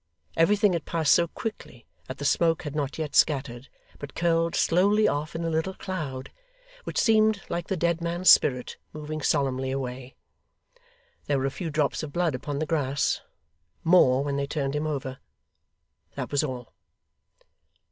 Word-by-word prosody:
Everything 200 Hz, +4 st, +3 dB
had 170 Hz, -, -2 dB
passed 160 Hz, -4 st, +2 dB
so 170 Hz, -, +3 dB
quickly, 160 Hz, -, -7 dB, 0.2 s
that 130 Hz, -, -7 dB
the 145 Hz, -, -5 dB
smoke 165 Hz, +2 st, +2 dB
had 150 Hz, -1 st, -6 dB
not 145 Hz, -2 st, -2 dB
yet 155 Hz, -2 st, -4 dB
scattered, 135 Hz, -4 st, +1 dB, 0.3 s
but 145 Hz, -1 st, -9 dB
curled 165 Hz, 0 st, +1 dB
slowly 205 Hz, +5 st, +3 dB
off 150 Hz, -1 st, -2 dB
in 165 Hz, -, -3 dB
a 165 Hz, -, -1 dB
little 160 Hz, +4 st, -1 dB
cloud, 145 Hz, -9 st, -5 dB, 0.5 s
which -, -, -2 dB
seemed 215 Hz, -3 st, +3 dB
like 170 Hz, 0 st, -3 dB
the 190 Hz, -, -2 dB
dead 170 Hz, 0 st, 0 dB
man's 170 Hz, +2 st, -2 dB
spirit 125 Hz, -6 st, +5 dB, 0.2 s
moving 155 Hz, 0 st, -5 dB
solemnly 130 Hz, -2 st, 0 dB
away. 130 Hz, -1 st, -5 dB, 1.1 s
There 145 Hz, -, +1 dB
were 135 Hz, -, -1 dB
a 135 Hz, -, -1 dB
few 170 Hz, +3 st, -5 dB
drops 150 Hz, -2 st, 0 dB
of 155 Hz, -2 st, -6 dB
blood 175 Hz, -3 st, +1 dB
upon 140 Hz, +3 st, -4 dB
the 155 Hz, -, -1 dB
grass 145 Hz, -3 st, 0 dB, 0.6 s
more, 140 Hz, -6 st, +5 dB
when 140 Hz, -1 st, -2 dB
they 140 Hz, 0 st, -1 dB
turned 140 Hz, -2 st, -2 dB
him 150 Hz, +1 st, -1 dB
over 135 Hz, -3 st, -4 dB, 1.0 s
that -, -, -5 dB
was 145 Hz, +1 st, +1 dB
all. 125 Hz, -5 st, -6 dB
150 Hz, 165 wpm, -26 LUFS, 135-170 Hz, 1.1 s, spirit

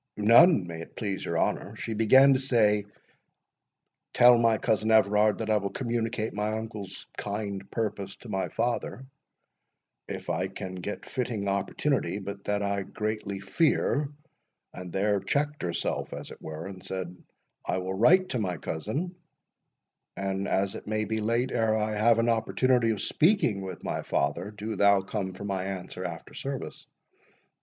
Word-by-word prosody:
"None, 115 Hz, -, +6 dB
may 85 Hz, -1 st, -6 dB
it -, -, -11 dB
please 100 Hz, -4 st, -3 dB
your -, -, -2 dB
honour—She 115 Hz, -, -2 dB
began 130 Hz, +6 st, +6 dB
to 130 Hz, -, +2 dB
say, 110 Hz, -6 st, +3 dB, 1.3 s
'Tell 120 Hz, 0 st, +8 dB
my 115 Hz, -1 st, +4 dB
cousin 110 Hz, 0 st, 0 dB
Everard 105 Hz, -1 st, +4 dB
that 110 Hz, -1 st, -2 dB
I 105 Hz, -, +4 dB
will 100 Hz, -1 st, -2 dB
communicate 115 Hz, -2 st, -2 dB
my 105 Hz, +1 st, -1 dB
uncle's 105 Hz, -4 st, -7 dB
kind 100 Hz, -1 st, -4 dB
purpose 100 Hz, -3 st, -3 dB
to -, -, -14 dB
my 95 Hz, -3 st, -2 dB
father, 120 Hz, +2 st, -2 dB, 1.0 s
if -, -, -6 dB
I 95 Hz, -, 0 dB
can 95 Hz, -1 st, -7 dB
get 95 Hz, +3 st, -5 dB
fitting 115 Hz, -5 st, -3 dB
opportunity—but 100 Hz, -1 st, -1 dB
that 105 Hz, 0 st, 0 dB
I 100 Hz, 0 st, 0 dB
greatly 105 Hz, -1 st, -4 dB
fear'—and 145 Hz, -, -2 dB
there 100 Hz, +2 st, +1 dB
checked 145 Hz, +9 st, -1 dB
herself, 85 Hz, -1 st, -2 dB
as -, -, -7 dB
it -, -, -12 dB
were, 80 Hz, +1 st, -6 dB
and 95 Hz, -1 st, -9 dB
said, 90 Hz, -2 st, -5 dB, 0.5 s
'I -, -, 0 dB
will 95 Hz, 0 st, -3 dB
write 180 Hz, -, +5 dB
to 125 Hz, -, -1 dB
my 90 Hz, -5 st, -1 dB
cousin; 110 Hz, -, -3 dB, 1.0 s
and 95 Hz, 0 st, -2 dB
as 95 Hz, 0 st, +1 dB
it -, -, -9 dB
may 110 Hz, 0 st, 0 dB
be 110 Hz, 0 st, -2 dB
late 115 Hz, +4 st, 0 dB
ere 110 Hz, -2 st, +2 dB
I 110 Hz, 0 st, -1 dB
have 110 Hz, +2 st, +4 dB
an 115 Hz, +1 st, +2 dB
opportunity 120 Hz, +1 st, +2 dB
of 110 Hz, -3 st, -1 dB
speaking 160 Hz, -, +2 dB
with 95 Hz, -2 st, -7 dB
my -, -, -2 dB
father, 80 Hz, +7 st, -1 dB
do 105 Hz, +1 st, -5 dB
thou 100 Hz, 0 st, +5 dB
come 95 Hz, -1 st, -4 dB
for 95 Hz, -, -9 dB
my 95 Hz, -2 st, -2 dB
answer 95 Hz, -1 st, -5 dB
after 85 Hz, -3 st, -6 dB
service. 135 Hz, -1 st, -6 dB
105 Hz, 155 wpm, -28 LUFS, 95-115 Hz, 1.3 s, Tell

